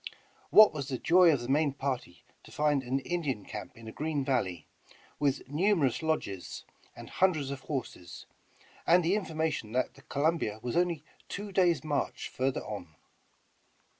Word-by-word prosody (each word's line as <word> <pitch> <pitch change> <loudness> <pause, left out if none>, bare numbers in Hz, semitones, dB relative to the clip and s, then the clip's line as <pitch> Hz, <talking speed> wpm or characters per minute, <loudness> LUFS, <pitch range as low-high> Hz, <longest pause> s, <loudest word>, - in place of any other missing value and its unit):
What 215 -4 +8
was 140 -3 -4
the 130 -3 -2
joy 175 +4 +5
of 140 -5 0
the 120 - -5
main 145 +1 +2
party 135 -10 -4 0.2
to - - -16
find 150 -2 +2
an 130 +2 -1
Indian 145 - -2
camp 105 +1 -8
in 115 -1 -11
a - - -6
green 150 -1 -2
valley, 95 - -1 0.5
with 140 -2 0
numerous 155 - +2
lodges 155 - -3 0.3
and - - -10
hundreds 155 -7 +1
of 140 - -5
horses, 125 - -6 0.6
and 175 0 +5
the 175 - +3
in 210 -2 0
formation 155 -8 -2
that 130 - 0
the 135 - -17
Columbia 145 -6 0
was 120 - -3
only 170 -4 +1 0.3
two 205 0 -5
days' 175 -7 +3
march 145 -2 -2
further 130 +1 -1
on. 90 -7 -7
140 Hz, 165 wpm, -30 LUFS, 125-165 Hz, 0.6 s, What